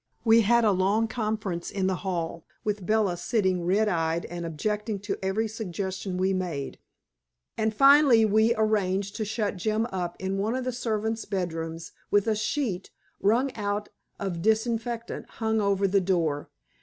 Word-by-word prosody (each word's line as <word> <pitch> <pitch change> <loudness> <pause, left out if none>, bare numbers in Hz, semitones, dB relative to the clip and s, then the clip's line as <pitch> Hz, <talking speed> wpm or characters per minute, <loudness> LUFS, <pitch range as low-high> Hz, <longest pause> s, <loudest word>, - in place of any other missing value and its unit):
We 225 0 +6
had 235 +2 +4
a 210 - +5
long 200 +4 +2
conference 215 -6 -3
in 195 -2 -2
the 190 -1 +1
hall, 170 -4 -3 0.2
with 205 -3 -2
Bella 215 -5 +2
sitting 185 -1 0
red 210 +4 +3
eyed 165 -3 0
and 175 0 -5
objecting 210 +6 -2
to 205 0 -3
every 200 +4 0
suggestion 190 -3 -4
we 190 +1 +1
made. 170 -7 -3 0.8
And 220 0 +1
finally 275 -1 +6
we 220 +2 +3
arranged 200 -2 0
to 215 - -1
shut 210 -2 -2
Jim 215 +4 0
up 180 -2 -3
in 190 +1 -2
one 215 +5 0
of 260 - -2
the 255 - -1
servants' 225 -1 -2
bedrooms 165 -4 -4 0.2
with 205 -1 +3
a 220 -1 +1
sheet 215 - -2 0.3
wrung 245 +6 +2
out 205 -1 -2 0.3
of 180 -4 -3
disinfectant 230 +2 -1
hung 220 -1 0
over 200 -1 +2
the 195 +1 +3
door. 165 -6 0
205 Hz, 160 wpm, -27 LUFS, 185-220 Hz, 0.8 s, We